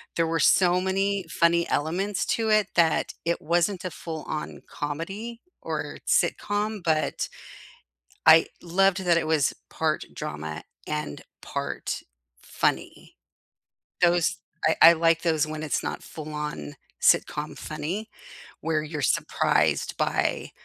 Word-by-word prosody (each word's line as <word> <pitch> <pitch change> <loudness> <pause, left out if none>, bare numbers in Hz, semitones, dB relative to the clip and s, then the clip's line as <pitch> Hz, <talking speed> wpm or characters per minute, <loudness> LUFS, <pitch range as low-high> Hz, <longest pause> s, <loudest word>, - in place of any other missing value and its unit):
there 165 -1 +2
were 165 0 0
so 180 -1 +4
many 195 0 0
funny 170 +1 +2
elements 185 +7 -1
to 225 -1 -1
it 215 -1 +4
that 165 -2 +2
it 170 - 0
wasn't 175 +3 0
a 180 - -3
full-on 155 -1 -6
comedy 195 +11 -5 0.2
or - - -4
sitcom, 205 -1 0
but 155 -2 0 1.0
I 160 +1 +8
loved 190 +2 +2
that 170 -1 +4
it 160 - 0
was 155 -4 +2 0.2
part - - -1
drama 75 +1 -5 0.2
and 75 -1 -4 0.2
part - - -4 0.4
funny. - - -2 0.9
Those 175 -1 +3 0.3
I 160 - +4
I 165 - +11
like 165 0 +2
those 160 -3 +2
when 155 0 -5
it's 155 - -1
not - - -4
full-on 150 - -6 0.3
sitcom 150 +1 +2
funny, 165 +8 -4 0.5
where 155 -1 0
you're 150 -1 -5
surprised - - +1
by, - - 0
165 Hz, 120 wpm, -26 LUFS, 155-190 Hz, 1.0 s, I